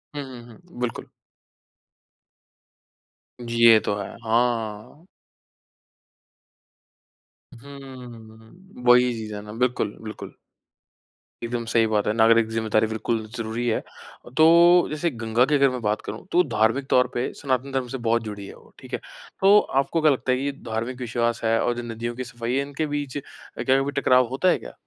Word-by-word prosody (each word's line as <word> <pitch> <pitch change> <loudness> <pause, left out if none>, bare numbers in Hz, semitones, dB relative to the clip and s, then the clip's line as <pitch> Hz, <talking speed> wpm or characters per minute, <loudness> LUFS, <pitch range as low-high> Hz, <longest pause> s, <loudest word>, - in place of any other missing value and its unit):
हुँ, 145 - -3
हुँ, 125 -3 -10
हुँ। 170 +4 -16
बिल्कुल। 125 -1 -3 2.4
जी, 115 0 -5
ये 110 -1 +8
तो 100 - 0
है। 100 - -5
हाँ। 115 +5 -1 2.6
हुँ, 125 - -13
वही 125 0 +5
चीज़ 110 -2 -6
है 105 - -6
ना। 105 0 -10
बिल्कुल, 120 -4 -1
बिल्कुल। 110 -1 -8 1.1
एकदम 115 0 -3
सही 115 -1 +4
बात 105 -1 0
है। 105 - +1
नागरिक 115 0 +4
ज़िम्मेदारी 110 -1 +1
बिल्कुल 110 0 -2
ज़रूरी 115 +2 -3
है। 110 - +1 0.6
तो 155 - +7 0.4
जैसे 155 +3 -1
गंगा 115 +3 +3
की 150 +2 +1
अगर 140 -1 +4
मैं 125 -1 -5
बात 105 0 -1
करूँ, - - -8
तो 180 +1 +4
धार्मिक 115 +6 +1
तौर 125 0 +4
पे 120 - -2
सनातन 135 -1 -1
धर्म 130 -2 -2
से 130 - -5
बहुत 115 0 +2
जुड़ी 100 -2 -7
है - - -11
वो। - - -20
ठीक - - -14
है? - - -1 0.4
तो 200 +2 +7 0.2
आपको 165 +4 -2
क्या 155 -1 +5
लगता 130 -1 -1
है, 125 - +2
ये 140 +1 -1 0.2
धार्मिक 115 +3 -3
विश्वास 120 -1 -1
है, 115 0 +2
और 120 - +1
जो 120 - -4
नदियों 120 +1 -5
की 130 - -4
सफ़ाई 120 0 -5
है, 140 - +2
इनके 145 +2 -3
बीच 145 -2 -4
क्या 135 -1 -2
कभी 140 +1 -2
टकराव 125 -1 +4
होता 160 +8 +2
है - - +3
क्या? - - -11
120 Hz, 165 wpm, -24 LUFS, 110-135 Hz, 2.6 s, ये